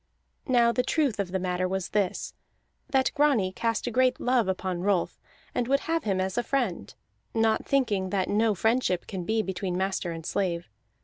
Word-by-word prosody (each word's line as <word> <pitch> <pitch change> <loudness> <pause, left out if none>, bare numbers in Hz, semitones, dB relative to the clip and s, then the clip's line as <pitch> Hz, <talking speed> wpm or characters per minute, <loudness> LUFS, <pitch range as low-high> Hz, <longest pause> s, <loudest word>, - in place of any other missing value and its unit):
Now 240 -3 +4
the 250 - +1
truth 265 -3 0
of 190 -3 -2
the 190 - 0
matter 185 0 -1
was 190 -1 -2
this, 200 -3 -1 0.6
that 265 -3 +2
Grani 280 -11 +3
cast 230 +3 -1
a 245 - -2
great 255 +2 +2
love 245 -4 +2
upon 185 -1 -2
Rolf, 190 -2 0 0.3
and 245 - -1
would 275 +2 +2
have 330 -1 -1
him 195 -3 +1
as 190 +4 0
a - - -1
friend, 235 - -1 0.4
not 225 -1 +2
thinking 215 -9 +1
that 190 -1 0
no 215 +1 +2
friendship 220 -3 +1
can 185 -4 -5
be 220 +2 +1
between 185 -2 -3
master 190 -2 -1
and 165 -1 -7
slave. 175 - -2
205 Hz, 185 wpm, -27 LUFS, 185-245 Hz, 0.6 s, Now